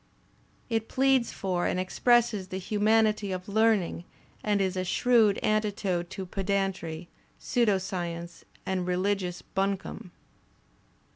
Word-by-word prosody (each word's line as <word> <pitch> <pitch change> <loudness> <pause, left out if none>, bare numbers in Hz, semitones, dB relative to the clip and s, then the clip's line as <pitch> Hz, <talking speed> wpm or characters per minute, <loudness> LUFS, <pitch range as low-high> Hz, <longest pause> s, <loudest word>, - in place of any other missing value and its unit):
It 225 -2 -1
pleads 265 -2 +2
for 180 -2 -1
and 180 - -1
expresses 215 +1 +2
the 185 - -5
humanity 215 +1 +2
of 185 0 -5
learning 210 -5 +2 0.4
and 205 -1 +1
is 190 -1 0
a 185 - -1
shrewd 220 +2 +3
antidote 200 -5 0
to 190 0 -6
pedantry, 190 -4 -2 0.3
pseudo 235 -6 +2
science 175 -2 -5 0.2
and 185 -1 -1
religious 180 -1 -1
bimcome. 195 -1 -3
195 Hz, 115 wpm, -28 LUFS, 180-215 Hz, 0.4 s, shrewd